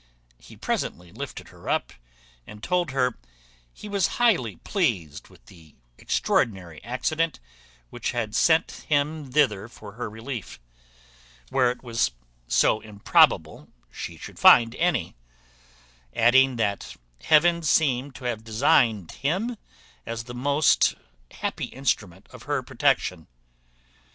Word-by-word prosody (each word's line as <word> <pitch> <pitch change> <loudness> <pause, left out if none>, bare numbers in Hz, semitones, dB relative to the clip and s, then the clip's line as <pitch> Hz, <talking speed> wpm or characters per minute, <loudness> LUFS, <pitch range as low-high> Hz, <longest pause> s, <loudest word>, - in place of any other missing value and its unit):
He - - -15
presently 85 0 -3
lifted - - -8
her - - -10
up, - - -1 0.5
and 105 0 -12
told 180 -1 0
her 125 -2 0 0.5
he 210 - -11
was 200 -4 +1
highly 175 - +2
pleased 95 - -2
with - - -21
the 80 -4 -18 0.2
extraordinary 90 -8 -1
accident 155 +8 -1 0.5
which - - -3
had 115 -3 -3
sent 160 +7 +2
him 145 -1 0
thither 115 -8 +2
for 110 -3 -12
her 115 +2 -6
relief, 110 - -7 0.9
where 130 -2 +3
it 125 - -6
was 115 -2 0 0.3
so 110 - +3
improbable 105 -2 +2 0.2
she - - -7
should - - -11
find 115 -1 +7
any; 170 - 0 1.0
adding, 130 +3 +5
that 100 -4 -2 0.3
Heaven 170 - +4
seemed 140 -3 +1
to 115 - -11
have 120 -3 -3
designed 115 - +2
him 190 - -2 0.5
as 115 0 -5
the 130 +4 +2 0.3
happy - - -4
instrument 105 -9 -3
of - - -12
her - - 0
protection. 85 -4 0
125 Hz, 120 wpm, -25 LUFS, 105-150 Hz, 1.0 s, find